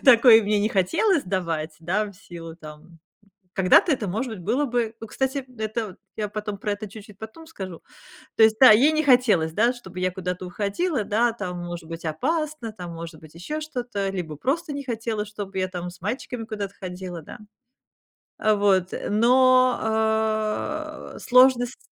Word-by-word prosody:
такой 235 -3 +8
мне 210 0 +1
не 215 - +2
хотелось 280 - +2
давать, 165 -4 -2
да, 195 +6 0
в 200 - -11
силу 170 -4 -10
там, 150 -2 -11
м. 165 -2 -19 0.6
Когда-то 190 - +5
это, 240 -6 -1
может 225 +7 -2
быть, 190 - -10
было 290 +4 +1
бы. 235 -3 -1
Ну, 225 - -6
кстати, 265 +2 -2
это 220 -3 -3 0.2
я 210 -1 -2
потом 210 -1 -5
про 205 0 -2
это 205 +1 -5
чуть-чуть 210 -1 -12
потом 220 +10 -10
скажу. 190 - -8 0.6
То 220 - +6
есть, 220 0 +6
да, 260 - +11
ей 260 +9 +6
не 310 0 +1
хотелось, 225 - +4
да, 235 +5 +3
чтобы 190 -7 -10
я 185 0 +1
куда-то 180 0 -4
уходила, 210 - -1
да, 230 +4 +2
там, 180 -5 -5
может 170 -1 -7
быть, 165 0 -7
опасно, 290 - -2
там, 180 -4 -8
может 165 -1 -8
быть, 155 -1 -15
ещё 245 - -5
что-то, 245 -9 -3
либо 175 -5 -4
просто 300 - -1
не 280 0 -5
хотела, 225 -3 -3
чтоб 205 -2 -7
я 185 -1 0
там 180 -1 -5
с 180 - -16
мальчиками 230 +3 -4
куда-то 205 -3 -5
ходила, 180 -2 -6
да. - - -11 1.0
А 215 0 +3
вот, 195 -3 +2 0.2
но, 225 +3 +2
э, - - -9
сложность 250 0 +4
215 Hz, 175 wpm, -24 LUFS, 185-245 Hz, 1.0 s, да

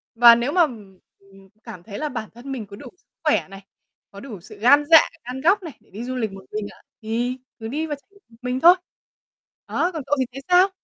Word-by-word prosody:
Và 235 0 +9
nếu 240 +5 -1
mà, 355 +1 +3
ừm, 210 - -6 0.2
ừm, 195 -1 -20
cảm 175 -1 -10
thấy 205 -2 -8
là 300 -1 -2
bản 225 -4 -5
thân 245 +4 -9
mình 245 -6 -4
có 200 - -11
đủ - - -11
sức - - -38 0.2
khỏe - - +2
này, 195 0 -12 0.5
có 200 - -11
đủ 215 -6 -9
sự - - -13
gan 285 +6 +6
dạ, 320 - +11 0.3
gan 255 +2 -6
góc 375 +5 +3
này 320 - -9
để - - -29
đi 210 +5 -7
du 255 +1 -4
lịch 225 -5 -2
một 195 0 -11
mình 210 -1 -3
ạ, - - -19 0.2
thì 240 +3 -2 0.2
cứ 225 - -6
đi 300 +7 -2
và 295 - -3
trải 280 - -25
nghiệm 400 0 -23
một 230 - -20
mình 250 +1 -2
thôi. 345 +4 +8 0.9
Đó, 350 - 0
còn 315 - -5
cậu 290 - +1
thì 260 - +2
thấy 270 +2 -8
sao? 360 +2 +6
245 Hz, 255 wpm, -22 LUFS, 210-290 Hz, 0.9 s, dạ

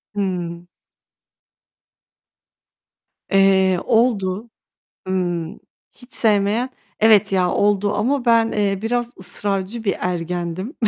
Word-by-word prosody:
Hımm. 175 -3 -3 2.6
Eee, 190 -2 +4
oldu. 220 -2 +1 0.6
Imm, 175 -1 -2 0.3
hiç 250 0 -19
sevmeyen 215 +3 +1 0.3
evet 215 -2 +5
ya 180 -2 +2
oldu 205 0 +1
ama 255 +4 0
ben, 230 -1 +3
eee, 200 -2 0
biraz 240 +1 -2
ısrarcı 195 +4 -2
bir 200 - +1
ergendim. 180 - -3
200 Hz, 90 wpm, -20 LUFS, 185-225 Hz, 2.6 s, evet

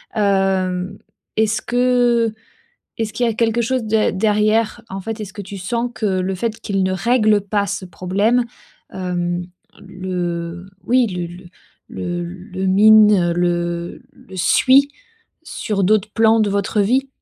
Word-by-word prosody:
hem, 190 -2 0 0.4
est-ce 220 0 +1
que 245 -2 +2 0.6
est-ce 220 -1 -3
qu'il 245 - 0
y - - +2
a 225 - -1
quelque 230 0 +1
chose 255 +2 0
d 215 0 +2
derrière? 215 +2 +1
En 195 0 -6
fait, 225 +2 -5
est-ce 200 -2 -7
que 205 - -6
tu 200 +1 -8
sens 235 +6 -2
que 220 - -2
le 190 -1 -1
fait 225 +3 -3
qu'il 195 -3 -1
ne 185 0 0
règle 215 +1 +2
pas 200 0 -1
ce 200 -1 -4
problème, 195 +8 0 0.5
hem, 180 -1 -2 0.4
le 175 -2 -4 0.2
oui, 250 0 +3
le 180 -3 -4
le 175 +2 -12 0.4
le 175 0 -4
le 185 +2 -6
mine, 210 -2 +6
le 175 0 -2
le 190 - -14
suit 265 +9 +4 0.6
sur 200 -9 -2
d'autres 215 +1 +2
plans 225 0 +4
de 210 - +2
votre 200 +2 0
vie? 260 +7 +1
200 Hz, 150 wpm, -19 LUFS, 185-225 Hz, 0.6 s, mine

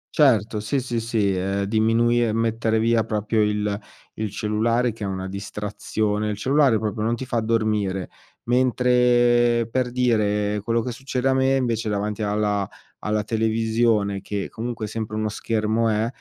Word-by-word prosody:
Certo. 110 -7 +3
Sì, 110 +7 -1
sì, 120 -2 -2
sì. 110 -4 0
Ehm, 95 +2 -1
diminui 115 +3 +2
e 110 - 0
mettere 115 0 0
via 115 0 +2
proprio 110 0 0
il 105 -1 0 0.4
il 110 -1 -2
cellulare 115 +4 0
che 115 -1 -9
è - - -2
una 95 -1 -4
distrazione. 105 +2 -3
Il 105 - -3
cellulare 135 0 +3
proprio 105 0 -3
non 115 +2 +1
ti 130 - -6
fa 120 -2 -1
dormire. 105 -5 0 0.3
Mentre, 120 -1 +3
per 130 -1 0
dire, 105 -4 +1
quello 115 +1 0
che 125 - -3
succede 130 +1 -3
a - - +3
me 130 0 +2
invece, 115 -4 -1
davanti 105 +1 -2
alla 105 -1 0 0.3
alla 105 0 -1
televisione, 110 -2 +1
che 100 0 -4
comunque 115 -1 -4
sempre 110 0 -5
uno 110 0 -1
schermo 110 +1 0
è, 110 +1 +1
110 Hz, 160 wpm, -23 LUFS, 105-120 Hz, 0.4 s, Certo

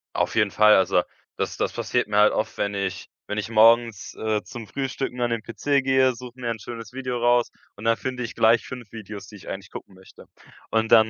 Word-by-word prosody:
Auf - - 0
jeden 105 -2 +3
Fall, 105 +1 +6
also, 95 -1 +3 0.3
das - - -3
das - - -1
passiert - - -1
mir 105 - -1
halt 105 0 +6
oft, 110 - -2
wenn 100 0 -1
ich 100 -2 -3 0.2
wenn 105 - -2
ich 105 +1 -3
morgens, 115 -1 +4
äh, 110 -1 -1
zum 115 -3 -9
Frühstücken 135 -1 -4
an 120 - +1
den 115 -1 -1
PC 140 +4 0
gehe, 130 -1 +3
suche 125 +1 -11
mir 120 -2 -3
ein 115 - -3
schönes 115 0 -8
Video 130 -2 -3
raus 120 0 +3 0.3
und 105 - -11
dann 115 0 +3
finde 130 -1 -4
ich 120 - -6
gleich 115 +1 +4
5 125 -4 -9
Videos, 105 -3 -8
die 105 - -13
ich 100 - -11
eigentlich 95 0 -6
gucken 95 - -10
möchte. 95 0 -16 0.4
Und 110 0 +1
dann 110 -1 +7
115 Hz, 225 wpm, -24 LUFS, 105-120 Hz, 0.4 s, dann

